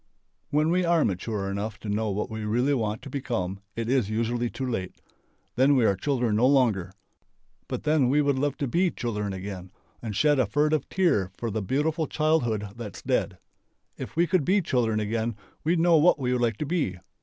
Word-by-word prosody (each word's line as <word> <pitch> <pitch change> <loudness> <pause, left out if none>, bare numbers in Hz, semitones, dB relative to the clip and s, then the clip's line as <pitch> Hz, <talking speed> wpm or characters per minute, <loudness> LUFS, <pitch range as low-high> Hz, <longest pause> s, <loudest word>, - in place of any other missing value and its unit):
When 155 +2 +2
we 180 +1 +2
are 170 -2 +3
mature 100 +1 -2
enough 105 +2 -4
to - - -7
know 105 +1 0
what 105 +1 -2
we 110 0 -4
really 120 +7 +1
want 110 -3 -2
to - - -8
become 100 -9 -3 0.2
it 115 -1 -3
is 125 -5 +1
usually 115 +2 -1
too 135 - -5
late. 105 -8 -4 0.6
Then 135 +3 +4
we 125 -4 +3
are 100 - +3
children 120 -1 0
no 125 +3 +4
longer. 115 -10 +2 0.8
But - - -4
then 150 -4 +3
we 145 +3 +3
would 140 -2 +2
love 145 0 -1
to 140 - -2
be 175 +8 +2
children 105 -8 -3
again 95 -1 -7 0.3
and 110 -3 -5
shed 145 +5 +3
a 125 - +2
furtive 150 +4 +1
tear 145 - +2
for 115 -2 -3
the 110 +1 -2
beautiful 150 - 0
childhood 120 -10 0
that's 110 -6 -8
dead.... - - 0 0.6
If - - -8
we 170 +2 +3
could 180 -3 +1
be 190 +7 +3
children 115 -6 +1
again 110 +1 -1 0.3
we'd 165 +2 +2
know 170 0 +5
what 165 +4 +5
we 125 -3 -1
would 125 - 0
like 115 -3 +1
to 150 - -3
be. 145 - -1
120 Hz, 200 wpm, -26 LUFS, 105-150 Hz, 0.8 s, know